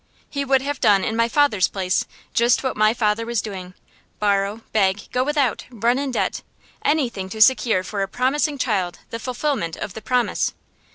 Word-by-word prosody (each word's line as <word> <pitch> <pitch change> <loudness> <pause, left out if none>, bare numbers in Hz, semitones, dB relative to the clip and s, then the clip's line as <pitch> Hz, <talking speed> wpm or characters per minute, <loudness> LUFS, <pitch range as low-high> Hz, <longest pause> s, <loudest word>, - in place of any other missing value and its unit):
He 280 -1 -1
would 270 -1 +2
have 285 -1 -3
done 200 -2 +4
in 220 - -1
my 230 0 +2
father's 260 -10 +3
place 185 -1 -1 0.3
just 235 +3 +3
what 260 - -1
my 215 0 +4
father 220 -1 0
was 235 -1 -1
doing: 185 -4 -6 0.4
borrow, 205 +1 0
beg, 195 -2 +2
go 250 - +1
without, 285 -4 0
run 240 +2 +1
in 280 -1 -2
debt 250 - -1 0.4
anything 240 -11 0
to 220 - -7
secure 225 -4 +4
for 200 +2 -4
a 195 - 0
promising 280 +6 0
child 195 -9 -1
the 230 - -4
fulfilment 250 - -2
of 185 - -6
the 220 - -8
promise. 250 +2 0
230 Hz, 180 wpm, -22 LUFS, 200-260 Hz, 0.4 s, done